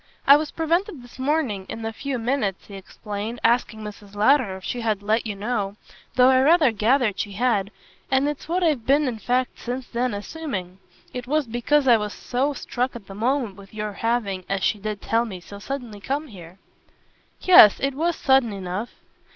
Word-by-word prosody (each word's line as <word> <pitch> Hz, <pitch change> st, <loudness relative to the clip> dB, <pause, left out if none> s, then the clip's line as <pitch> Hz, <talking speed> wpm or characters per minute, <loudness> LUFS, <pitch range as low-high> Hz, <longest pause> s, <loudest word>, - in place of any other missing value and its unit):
"I 280 Hz, -, +9 dB
was 305 Hz, +1 st, 0 dB
prevented 335 Hz, -, -1 dB
this 245 Hz, +1 st, -15 dB
morning, 260 Hz, -9 st, -1 dB
in 225 Hz, -, -6 dB
the 225 Hz, 0 st, -3 dB
few 275 Hz, +3 st, -3 dB
minutes," 225 Hz, -5 st, -1 dB
he 205 Hz, -, -13 dB
explained, 205 Hz, +3 st, -6 dB
"asking 230 Hz, -2 st, +1 dB
Mrs. 205 Hz, -1 st, -10 dB
Lowder 215 Hz, -2 st, +3 dB
if 190 Hz, -, -14 dB
she 245 Hz, -, -3 dB
had 215 Hz, -3 st, -1 dB
let 220 Hz, +2 st, +1 dB
you 210 Hz, -, -4 dB
know, 205 Hz, -1 st, -2 dB, 0.4 s
though 255 Hz, 0 st, +6 dB
I 260 Hz, 0 st, +5 dB
rather 305 Hz, -2 st, +5 dB
gathered 220 Hz, -1 st, +1 dB
she 205 Hz, -, -3 dB
had; 205 Hz, -3 st, +1 dB, 0.4 s
and 265 Hz, +2 st, +2 dB
it's 295 Hz, +1 st, -5 dB
what 360 Hz, +2 st, 0 dB
I've 300 Hz, -8 st, +1 dB
been 285 Hz, +2 st, +4 dB
in 230 Hz, -3 st, -3 dB
fact 250 Hz, +3 st, -1 dB
since 250 Hz, +1 st, -4 dB
then 240 Hz, -2 st, -1 dB
assuming. 200 Hz, -, -6 dB, 0.3 s
It 250 Hz, 0 st, -6 dB
was 300 Hz, +1 st, +1 dB
because 250 Hz, +5 st, +1 dB
I 240 Hz, -2 st, +7 dB
was 210 Hz, -1 st, -4 dB
so 265 Hz, +4 st, -1 dB
struck 250 Hz, -1 st, -3 dB
at 230 Hz, -4 st, -9 dB
the 195 Hz, -, -10 dB
moment 230 Hz, -1 st, -1 dB
with 200 Hz, +1 st, -14 dB
your 210 Hz, -1 st, -4 dB
having, 205 Hz, -4 st, -1 dB
as 195 Hz, -1 st, -1 dB
she 210 Hz, -, +1 dB
did 210 Hz, 0 st, -5 dB
tell 230 Hz, +1 st, +1 dB
me, 200 Hz, -6 st, -7 dB
so 200 Hz, +3 st, -11 dB
suddenly 240 Hz, -2 st, -6 dB
come 285 Hz, +6 st, -3 dB
here." 180 Hz, -4 st, -12 dB, 0.8 s
"Yes, 285 Hz, -, +8 dB
it 275 Hz, 0 st, 0 dB
was 330 Hz, +5 st, 0 dB
sudden 265 Hz, -4 st, +3 dB
enough." 195 Hz, +3 st, -4 dB
235 Hz, 195 wpm, -23 LUFS, 205-270 Hz, 0.8 s, I